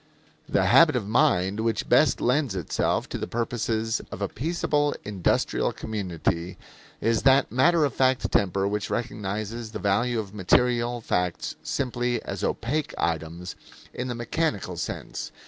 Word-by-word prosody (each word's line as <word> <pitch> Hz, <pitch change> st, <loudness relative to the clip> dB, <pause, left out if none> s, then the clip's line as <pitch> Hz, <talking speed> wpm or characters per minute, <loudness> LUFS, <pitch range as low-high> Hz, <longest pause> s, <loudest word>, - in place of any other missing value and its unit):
The -, -, +2 dB
habit -, -, +6 dB
of 100 Hz, -, -1 dB
mind 100 Hz, -2 st, +2 dB
which 115 Hz, 0 st, -1 dB
best 130 Hz, +2 st, +4 dB
lends 125 Hz, -3 st, +1 dB
itself 90 Hz, -4 st, -1 dB
to -, -, -4 dB
the -, -, -3 dB
purposes 115 Hz, -1 st, -1 dB
of -, -, -6 dB
a 100 Hz, -, -1 dB
peaceable, 145 Hz, -, 0 dB
industrial 100 Hz, -4 st, 0 dB
community, 90 Hz, -4 st, -3 dB, 0.4 s
is 115 Hz, -1 st, +2 dB
that 135 Hz, +1 st, +4 dB
matter 155 Hz, +5 st, +4 dB
of 140 Hz, -, -2 dB
fact 130 Hz, -1 st, +1 dB
temper 95 Hz, 0 st, +2 dB
which 105 Hz, +1 st, -2 dB
recognizes 110 Hz, 0 st, -4 dB
the -, -, -3 dB
value 110 Hz, +4 st, +1 dB
of 100 Hz, -2 st, -6 dB
material 120 Hz, +4 st, +2 dB
facts 90 Hz, -5 st, -1 dB
simply 120 Hz, -3 st, -1 dB
as -, -, -5 dB
opaque 145 Hz, +6 st, -1 dB
items 80 Hz, +2 st, -3 dB, 0.4 s
in 125 Hz, -, -4 dB
the 120 Hz, -, -3 dB
mechanical 115 Hz, -, -2 dB
sequence. 85 Hz, -, -5 dB
115 Hz, 145 wpm, -26 LUFS, 95-125 Hz, 0.4 s, habit